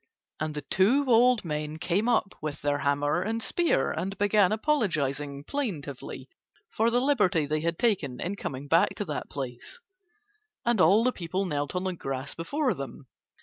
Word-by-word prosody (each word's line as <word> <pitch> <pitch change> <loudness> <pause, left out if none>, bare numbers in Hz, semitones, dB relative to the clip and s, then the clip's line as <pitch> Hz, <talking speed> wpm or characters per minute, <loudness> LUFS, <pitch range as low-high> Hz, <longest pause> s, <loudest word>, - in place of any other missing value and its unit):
And 155 0 -3
the 150 - -4
two 230 - +3
old 245 -2 +4
men 150 -1 -3
came 190 +7 0
up 220 -5 +1
with 155 -1 -5
their 145 0 +1
hammer 145 +4 +1
and 225 +4 -2
spear 340 +6 +1
and 195 +2 -3
began 205 -1 +3
apologizing 150 - 0
plaintively 160 - -5 0.4
for 225 - +2
the 240 +1 +2
liberty 205 - +2
they 155 +2 -1
had 170 +1 -1
taken 165 - 0
in 185 +4 -3
coming 140 -7 -5
back 165 +4 +3
to 205 - -3
that 150 -5 -4
place, 130 - -6 0.9
and 235 -5 +3
all 195 +7 +6
the 255 - +3
people 185 -1 -3
knelt 145 -2 -2
on 180 - -1
the 185 -1 -1
grass 135 -4 -4
before 260 - -1
them. 140 -2 -8
180 Hz, 170 wpm, -28 LUFS, 145-225 Hz, 0.9 s, all